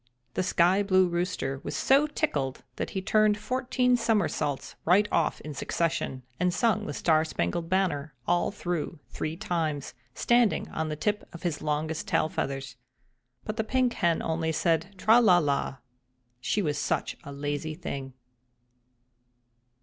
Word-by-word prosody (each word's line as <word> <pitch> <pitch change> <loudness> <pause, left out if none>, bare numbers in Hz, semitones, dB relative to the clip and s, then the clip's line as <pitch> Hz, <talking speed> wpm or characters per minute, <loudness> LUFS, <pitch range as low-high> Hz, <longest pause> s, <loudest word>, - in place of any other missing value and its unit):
The - - 0
Sky 180 +2 +3
blue 185 -2 +4
Rooster 170 -6 -2
was - - -4
so 280 +3 +4
tickled 145 - -2
that - - -2
he 190 - -2
turned 215 0 +3
fourteen 250 +3 +1
somersaults 205 - 0
right 195 +5 +4
off 165 - +1
in 150 - -7
succession, 140 -3 -2 0.2
and 180 0 +2
sung 215 +1 +1
"The - - -3
Star 155 -2 +3
Spangled 160 - -2
Banner" 160 -7 0
all 175 0 +2
through 175 -4 -3
three 155 +1 -4
times, 160 -9 -2 0.2
standing 240 -2 +3
on 160 0 -3
the 155 - -2
tip 210 +7 -2
of 170 - -10
his 170 -4 -2
longest 155 +1 -2
tail 155 - +2
feathers. 135 -3 -4 0.7
But 215 +1 -4
the 220 - +1
Pink 255 +1 +1
Hen 170 -3 +1
only 160 0 0
said 165 +4 0
"Tra 220 +6 +6
la 190 -6 +6
la!" 140 -4 0 0.6
she 200 - 0
was 150 -3 -1
such - - -1
a 140 - -8
lazy 145 +2 -3
thing. 135 -5 -6
170 Hz, 150 wpm, -28 LUFS, 150-210 Hz, 0.7 s, Tra